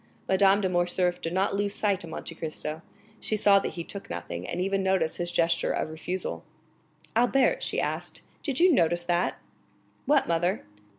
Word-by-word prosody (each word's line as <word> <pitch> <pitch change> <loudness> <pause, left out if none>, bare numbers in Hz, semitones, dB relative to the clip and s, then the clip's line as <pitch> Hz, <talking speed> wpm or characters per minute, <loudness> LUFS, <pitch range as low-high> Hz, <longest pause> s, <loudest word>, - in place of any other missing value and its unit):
Madame 195 +1 +4
de 190 - +1
Morcerf 175 0 +1
did 165 - -3
not 190 +2 +1
lose 200 0 0
sight 200 -4 0
of 165 - -8
Monte 165 - -6
Cristo; 155 -1 -4 0.4
she 215 - -2
saw 200 -1 +5
that - - -4
he 170 - -5
took 200 +3 -7
nothing, - - -5
and - - -3
even 195 +1 0
noticed 190 -4 +1
his 175 0 -2
gesture 170 -1 +1
of 155 - -2
refusal. 175 +4 -4 0.7
"Albert," 245 +3 +3
she - - -1
asked, - - -3 0.2
"did 280 -5 -2
you 355 0 +6
notice 175 - +2
that?" 175 0 0 0.7
"What, 290 0 +4
mother?" 175 +3 0
185 Hz, 175 wpm, -27 LUFS, 170-200 Hz, 0.7 s, you